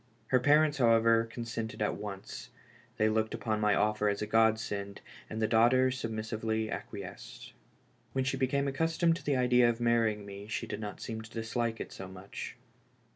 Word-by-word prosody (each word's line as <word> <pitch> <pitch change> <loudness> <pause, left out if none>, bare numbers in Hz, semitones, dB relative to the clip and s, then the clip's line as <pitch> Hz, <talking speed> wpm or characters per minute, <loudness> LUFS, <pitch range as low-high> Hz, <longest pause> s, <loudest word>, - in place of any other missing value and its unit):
Her 130 - +4
parents, 150 +3 +4
however, 115 -1 +4
consented 115 -1 -5
at 105 - 0
once; 100 -2 -7 0.5
they 110 - +3
looked 110 +1 0
upon 110 -1 -2
my 105 -1 +3
offer 105 0 +2
as 100 - -1
a - - -1
godsend, 110 -2 +1 0.3
and 110 - -4
the 110 - +2
daughter 120 +3 +4
submissively 110 -2 -2
acquiesced. 100 -4 -8 0.6
When 130 - +1
she 130 +1 0
be 130 -1 +1
came 140 +2 0
accustomed 165 +4 +1
to - - -12
the 140 -2 +1
idea 125 -1 +4
of 115 0 -2
marrying 115 -3 +2
me 100 0 -9
she 110 - -3
did - - -5
not 105 -2 -6
seem 110 -2 -5
to 110 - -11
dislike 115 0 -2
it - - -6
so 95 - -8
much. 95 +1 -8
115 Hz, 180 wpm, -31 LUFS, 105-125 Hz, 0.6 s, Her